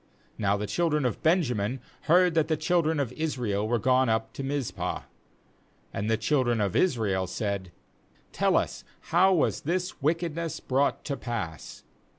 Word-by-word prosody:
— - - -33
3Now 100 -1 +2
the 105 - -3
children 150 - 0
of 125 - -1
Benjamin 130 - +1 0.3
heard 180 +1 +5
that 160 -2 +2
the 160 -1 +1
children 160 -1 +1
of 130 -3 -1
Israel 125 -9 -1
were 120 +1 +2
gone 130 +2 +3
up 110 0 0
to - - -5
Mizpah 135 -2 -3 0.4
— - - -36
And 105 +2 -2
the 110 - +2
children 120 0 +1
of 100 -3 0
Israel 105 - +1
said: 100 -1 -3 0.6
'Tejl - - +2
us, - - -2 0.3
how 185 +3 +5
was 175 -5 +2
this 180 +2 -2
wickedness 165 +1 -1
brought 135 +2 0
to 140 - -2
pass?' 110 - -5
130 Hz, 165 wpm, -27 LUFS, 110-160 Hz, 0.6 s, heard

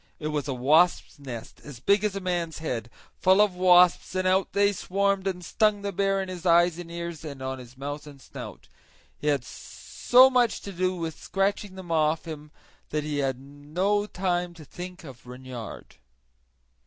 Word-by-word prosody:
It 155 - -3
was 150 -2 -2
a 135 - -1
wasp's 155 +6 +3
nest 125 -5 -8
as 140 -6 -10
big 200 - +3
as 210 -2 0
a - - -2
man's 175 -3 -2
head, 120 -7 -4 0.3
full 190 +2 +4
of 210 -2 +4
wasps, 180 0 +4
and 185 0 +1
out 190 +1 +2
they 200 0 +3
swarmed 195 0 0
and 180 -2 -3
stung 210 0 +1
the 200 - -2
bear 195 0 +1
in - - -7
his 180 -2 -7
eyes 175 -1 +4
and 175 -1 -8
ears 170 -2 -6
and 140 -4 -7
on 130 0 -4
his 125 0 -13
mouth 145 +2 -6
and 140 -2 -12
snout. - - -10 0.5
He 150 - -4
had 140 -4 +2
so 250 - +3
much 245 -3 +2
to 200 - -7
do 185 +1 0
with 165 -3 -5
scratching 195 0 -1
them 185 -3 -8
off 155 0 +1
him 150 -2 -8 0.4
that 150 0 -1
he 150 -1 -2
had 135 -2 -1
no 155 +10 -1
the 180 -2 -1
to 160 -2 -12
think 180 +4 -9
of 130 -5 -12
Reynard. 125 -2 -9
170 Hz, 190 wpm, -26 LUFS, 145-190 Hz, 0.5 s, full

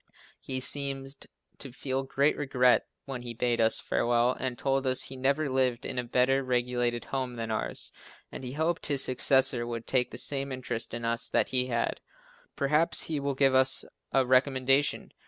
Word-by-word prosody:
He 130 -1 -4
seemed 135 0 -2 0.3
to 135 - -7
feel 130 +1 -3
great 140 +2 +1
regret 125 -3 +2 0.2
when 135 -3 -6
he 120 -1 -7
bade 120 0 0
us 110 0 +5
farewell 120 +1 +1
and 130 -1 -4
told 135 -1 0
us 130 0 +2
he 135 - -5
never 140 +4 0
lived 130 -2 0
in 125 - -3
a - - -2
better 130 +3 +2
regulated 120 -1 -1
home 130 -2 -3
than 115 -1 -4
ours 110 - -2 0.4
and - - -8
he 125 0 -5
hoped 160 +3 -1
his 140 -2 +2
successor 130 -1 +3
would 115 -1 -5
take 125 -2 +1
the - - -9
same 140 -1 -1
interest 125 -3 -5
in 120 - -5
us 115 0 -1
that - - +1
he 125 -1 +1
had. 120 -2 -2 0.5
Perhaps 150 +3 +3
he 155 -3 -2
will 140 -1 -2
give 135 0 +3
us 130 0 +2 0.3
a 135 -1 +3
recommendation! 130 +2 +2
130 Hz, 180 wpm, -28 LUFS, 125-135 Hz, 0.5 s, us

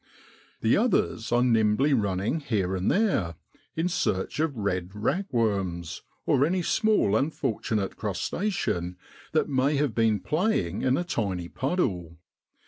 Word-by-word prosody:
The 110 - +3
others 200 - +1
are 120 +1 +4
nimbly 115 +4 +3
running 100 - 0
here 100 -10 -1
and 95 +1 0
there 190 - +1 0.4
in 165 +2 0
search 120 - -1
of 155 -5 0
red 90 -4 -1
ragworms, 105 - -1 0.2
or 130 - +3
any 175 +4 +1
small 210 - +2
unfortunate 110 -7 -1
crustacean 90 - -2 0.4
that 155 - +2
may 140 +1 +1
have 140 -4 +1
been 110 -2 +2
playing 150 - 0
in 130 +1 +2
a - - 0
tiny 95 - -2
puddle. 90 - -2
115 Hz, 130 wpm, -27 LUFS, 95-155 Hz, 0.4 s, are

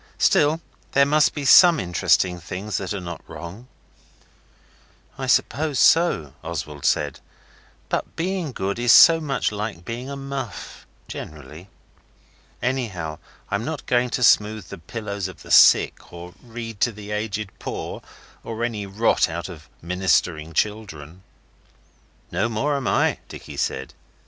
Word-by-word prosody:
Still, 155 +3 +3 0.3
there 140 0 +5
must 150 +1 +3
be 145 -2 -4
SOME 170 +2 +8
interesting 90 0 +1
things 95 +5 -5
that 95 - -4
are 100 - -2
not 85 -2 -7
wrong.' 95 +9 -9 1.5
'I 130 - -3
suppose 140 +3 +1
so,' 120 - +3
Oswald 75 -2 -5
said, - - +1 0.7
'but - - -3
being 175 -3 -2
good 100 -1 -3
is 120 -1 +4
so 165 +5 +8
much 135 -8 -1
like 105 -5 -5
being 120 +5 -5
a 140 - -5
muff, 135 -5 -7 0.2
generally. 75 +5 -9 0.9
Anyhow 105 -12 -2 0.3
I'm 100 +2 -1
not 155 +1 -5
going 125 0 +1
to 125 - -2
smooth 110 -2 +3
the 100 - -8
pillows 100 +2 -5
of 95 - -12
the - - -10
sick, - - +5
or 85 +1 -10
read 115 -3 -8
to 120 - +3
the 105 -1 -10
aged 105 -1 -3
poor, - - -5 0.4
or 115 0 -5
any 110 -4 -3
rot 105 0 +2
out 85 +3 -5
of 80 -3 -12
Ministering 85 -3 0
Children.' 90 -5 -3 1.1
'No 115 +4 0
more 135 +7 0
am 135 -3 -3
I,' - - +2
Dicky - - -9
said. - - -3
105 Hz, 140 wpm, -23 LUFS, 90-130 Hz, 1.5 s, SOME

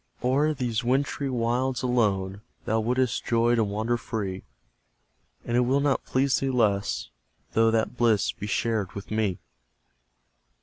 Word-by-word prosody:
O'er 140 +5 +2
these 120 -2 -1
wintry 135 +2 0
wilds, 125 +1 0
ALONE, 100 -6 0 0.2
Thou 110 - +1
wouldst 125 +2 0
joy 120 0 +2
to 115 -2 +3
wander 110 +4 -1
free; 100 -5 -4 1.0
And 120 - -1
it - - +4
will 130 +3 +2
not 140 -1 +1
please 130 +1 +1
thee 135 - -1
less, 105 -6 0 0.4
Though 115 0 +4
that 115 +2 0
bliss 115 -4 +3
be 105 - -7
shared 110 -2 -1
with 100 +1 -8
me. 105 -4 0
115 Hz, 140 wpm, -26 LUFS, 110-125 Hz, 1.0 s, it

